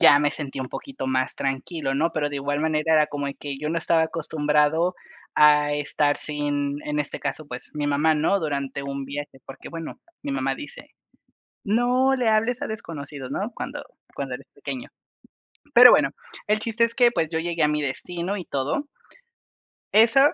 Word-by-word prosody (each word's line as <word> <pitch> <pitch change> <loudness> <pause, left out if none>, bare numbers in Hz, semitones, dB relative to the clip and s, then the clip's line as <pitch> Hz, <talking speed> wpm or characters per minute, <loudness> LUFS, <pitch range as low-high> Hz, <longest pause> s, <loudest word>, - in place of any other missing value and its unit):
ya 145 - +8
me 145 0 +2
sentí 140 -3 -5
un 130 - -4
poquito 270 - -6
más 130 0 0
tranquilo, 135 +1 -2
¿no?, 160 +4 +2
pero 145 -2 -1
de 145 - -4
igual 145 +1 -1
manera, 160 0 +2
era 155 -1 +5
como 145 -1 -3
que 140 -2 -5
yo 150 +1 -3
no 165 - -1
estaba 165 0 +2
acostumbrado 160 +1 +1 0.4
a 150 -1 +5
estar 145 0 +1
sin, 145 -1 -2
en 150 0 -1
este 145 - -4
caso, 145 +2 -4
pues, 125 -2 -7
mi 145 -1 -1
mamá, 150 +2 +3
¿no?, 160 +6 +2
durante 140 -3 -3
un 140 0 -4
viaje, 140 0 -6
porque, 135 - -10
bueno, 165 -1 -7 0.2
mi 140 - -3
mamá 135 0 0
dice: 485 +12 -8 0.7
"No 250 +5 +3
le 245 -3 +1
hables 230 +5 +2
a - - -1
desconocidos, 145 -10 -7
¿no?, 205 +10 -3
cuando - - -5 0.4
cuando - - -3
eres - - -10
pequeño". - - -6 0.9
Pero 245 +1 +11
bueno, - - +5 0.4
el 210 +1 +2
chiste 230 +1 +2
es 230 0 -2
que, 240 -1 +5
pues, 160 -9 0
yo 160 0 -1
llegué 170 -2 0
a - - +4
mi 150 0 0
destino 175 +7 -3
y 180 - -5
todo. 145 - -2 1.0
Eso 225 +5 +6
150 Hz, 185 wpm, -24 LUFS, 145-180 Hz, 1.0 s, Pero